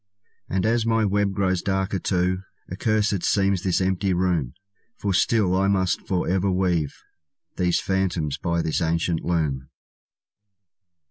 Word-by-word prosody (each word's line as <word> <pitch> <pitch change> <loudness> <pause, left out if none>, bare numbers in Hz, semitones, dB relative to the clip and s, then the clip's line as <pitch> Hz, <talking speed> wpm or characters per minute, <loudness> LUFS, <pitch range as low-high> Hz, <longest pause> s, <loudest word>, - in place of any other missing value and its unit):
And 95 0 0
as 115 +1 +2
my 115 -1 +2
web 100 0 +1
grows 95 -2 0
darker 95 0 -1
too, 90 0 0 0.3
Accursed 105 -3 0
seems 100 -2 +2
this 95 -3 +1
empty 95 0 0
room; 85 -8 0 0.4
For 100 -1 -1
still 95 -1 +2
I 95 +1 +2
must 95 -2 0
forever 95 0 0
weave 90 -5 0 0.6
These 90 -1 +2
phantoms 90 -6 -1
by 85 +1 -1
this 80 - -1
ancient 85 0 0
loom. 75 -6 -1
95 Hz, 130 wpm, -24 LUFS, 85-100 Hz, 0.6 s, as